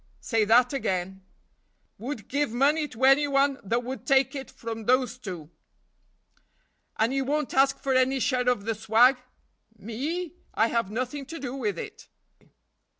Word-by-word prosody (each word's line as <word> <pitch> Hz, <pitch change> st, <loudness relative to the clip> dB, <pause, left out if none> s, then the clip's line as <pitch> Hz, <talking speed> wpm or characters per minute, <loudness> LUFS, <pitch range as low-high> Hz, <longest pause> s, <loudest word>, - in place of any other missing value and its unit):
"Say 225 Hz, -3 st, 0 dB
that 245 Hz, +4 st, +4 dB
again." 190 Hz, -6 st, -2 dB, 0.8 s
"Would 240 Hz, -2 st, -6 dB
give 285 Hz, +1 st, 0 dB
money 290 Hz, +5 st, +2 dB
to 255 Hz, -2 st, -9 dB
any 275 Hz, +2 st, +5 dB
one 275 Hz, 0 st, +2 dB
that 235 Hz, +5 st, -1 dB
would 260 Hz, +2 st, -7 dB
take 270 Hz, -2 st, +3 dB
it 270 Hz, -2 st, -6 dB
from 225 Hz, -1 st, -7 dB
those 250 Hz, 0 st, +1 dB
two." 175 Hz, -8 st, -8 dB, 1.5 s
"And 225 Hz, +4 st, +1 dB
you 270 Hz, 0 st, 0 dB
won't 295 Hz, +1 st, -2 dB
ask 270 Hz, +1 st, +3 dB
for 270 Hz, -, -1 dB
any 260 Hz, +1 st, +2 dB
share 250 Hz, -1 st, +1 dB
of 210 Hz, -5 st, -1 dB
the 225 Hz, -, 0 dB
swag?" 225 Hz, +4 st, +4 dB, 0.6 s
"Me? 290 Hz, -, -4 dB, 0.2 s
I 225 Hz, +2 st, +3 dB
have 230 Hz, -4 st, 0 dB
nothing 255 Hz, +5 st, -4 dB
to 330 Hz, -, -7 dB
do 260 Hz, -4 st, -5 dB
with 210 Hz, -9 st, -2 dB
it." -, -, -8 dB
255 Hz, 155 wpm, -26 LUFS, 225-275 Hz, 1.5 s, any